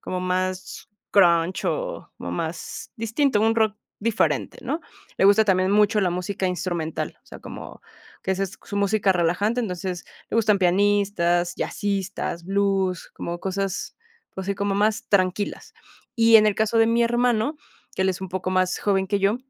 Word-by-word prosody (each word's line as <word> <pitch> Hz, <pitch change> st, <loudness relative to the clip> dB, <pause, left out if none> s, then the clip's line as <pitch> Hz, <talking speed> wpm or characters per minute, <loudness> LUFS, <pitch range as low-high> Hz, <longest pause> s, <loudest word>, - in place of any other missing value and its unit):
como 180 Hz, 0 st, -4 dB
más 185 Hz, 0 st, -3 dB, 0.2 s
Grunge 175 Hz, -2 st, +3 dB
o -, -, -3 dB
más -, -, -5 dB
distinto, 230 Hz, +1 st, +1 dB
un 225 Hz, +1 st, +3 dB
rock 220 Hz, -2 st, +2 dB, 0.2 s
diferente, 225 Hz, +1 st, 0 dB
¿no?, 325 Hz, -, -2 dB, 0.4 s
le -, -, +2 dB
gusta 205 Hz, +2 st, +6 dB
también 185 Hz, -1 st, +2 dB
mucho 210 Hz, +1 st, +4 dB
la 185 Hz, -3 st, +1 dB
música 185 Hz, +2 st, -2 dB
instrumental, 175 Hz, -3 st, -3 dB
o -, -, -40 dB
sea, -, -, -11 dB
como, -, -, -10 dB, 0.4 s
que 190 Hz, -, +1 dB
esa 190 Hz, +1 st, -2 dB
es 195 Hz, 0 st, -5 dB
su 205 Hz, -, -5 dB
música 200 Hz, -1 st, +2 dB
relajante, 185 Hz, +7 st, +1 dB
entonces, 180 Hz, -4 st, -4 dB, 0.3 s
le -, -, -3 dB
gustan 210 Hz, -3 st, +3 dB
pianistas, 185 Hz, -2 st, +2 dB
jazzistas, 195 Hz, -4 st, -3 dB
blues, 195 Hz, -2 st, 0 dB
como 170 Hz, 0 st, -5 dB
cosas, 195 Hz, 0 st, -3 dB, 0.4 s
así 195 Hz, +1 st, -2 dB
como 200 Hz, -1 st, -1 dB
más 210 Hz, +2 st, +1 dB
tranquilas. 195 Hz, 0 st, 0 dB, 0.4 s
Y 230 Hz, 0 st, +7 dB
en 215 Hz, 0 st, +5 dB
el 210 Hz, -, +2 dB
caso 220 Hz, +1 st, +1 dB
de 225 Hz, -, +5 dB
mi 230 Hz, +1 st, +3 dB
hermano, 240 Hz, +3 st, +1 dB, 0.4 s
que 190 Hz, -, 0 dB
él 190 Hz, -, +2 dB
es 185 Hz, 0 st, -2 dB
un 190 Hz, -, -5 dB
poco 185 Hz, 0 st, -3 dB
más 185 Hz, 0 st, +1 dB
joven 195 Hz, -2 st, +1 dB
que 200 Hz, +1 st, 0 dB
yo, 200 Hz, +4 st, +2 dB
200 Hz, 165 wpm, -24 LUFS, 185-215 Hz, 0.4 s, Y